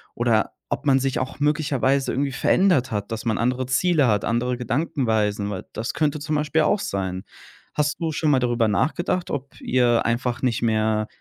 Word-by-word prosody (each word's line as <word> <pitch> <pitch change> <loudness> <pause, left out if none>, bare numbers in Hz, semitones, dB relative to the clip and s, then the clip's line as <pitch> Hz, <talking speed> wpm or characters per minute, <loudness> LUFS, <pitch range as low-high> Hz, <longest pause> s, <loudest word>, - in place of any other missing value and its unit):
oder 115 -2 +1 0.2
ob 150 - -3
man 135 -1 +4
sich 135 -1 -1
auch 130 +2 -5
möglicherweise 145 -3 +1
irgendwie 140 +1 -1
verändert 175 -6 +2
hat, 105 0 -3
dass 110 - -5
man 110 -2 0
andere 125 +2 0
Ziele 145 +1 +2
hat, 105 -2 +1
andere 120 +2 0
Gedankenweisen, 110 -8 -1
weil 95 -2 -5
das 115 +5 -3
könnte 150 -1 0
zum 150 +1 -2
Beispiel 150 +1 +1
auch 205 - +2
sein. 95 - -3 0.5
Hast 150 -1 0
du 160 -1 0
schon 155 0 0
mal 130 - +4
darüber 120 -2 +1
nachgedacht, 165 - 0
ob 140 -1 -5
ihr 120 -2 +2
einfach 120 +2 -1
nicht 120 -3 +1
mehr, 110 -1 +1
130 Hz, 180 wpm, -23 LUFS, 115-150 Hz, 0.5 s, man